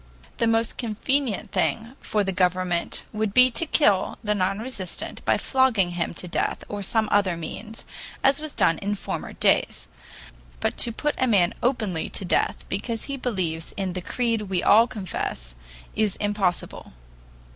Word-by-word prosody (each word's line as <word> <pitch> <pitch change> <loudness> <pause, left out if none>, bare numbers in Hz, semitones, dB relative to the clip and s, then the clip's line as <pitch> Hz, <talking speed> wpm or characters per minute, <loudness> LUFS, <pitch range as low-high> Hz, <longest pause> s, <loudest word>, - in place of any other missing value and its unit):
The 230 - +2
most 225 0 +1
convenient 240 +1 -1
thing 230 +3 -1
for 210 -1 0
the 195 - -1
government 180 -1 0
would 215 -1 -2
be 255 0 +7
to 330 +7 +2
kill 210 -12 +3
the 210 -1 +1
non 195 -1 0
resistant 215 -6 -4
by - - +3
flogging 250 -9 +2
him 175 -1 -2
to 180 - -5
death 170 - -1
or 205 0 -5
some 220 +2 +1
other 195 -4 +3
means, 215 +7 -7 0.4
as 270 +1 +4
was 310 -1 -6
done 165 -1 +3
in 205 +1 -1
former - - -5
days. - - +2 0.7
But - - 0
to 235 - +3
put 295 +6 -1
a 255 - +3
man 190 -7 +3
openly 220 -9 0
to 195 - 0
death 175 - 0
because 225 +4 -3
he 280 - -4
believes 185 -11 -3
in 190 -2 -2
the 185 - -3
creed 230 +3 0
we 185 -2 0
all 225 +3 +6
confess 170 - -5 0.4
is 215 -3 +1
impossible. 205 - -2
205 Hz, 165 wpm, -25 LUFS, 185-235 Hz, 0.7 s, be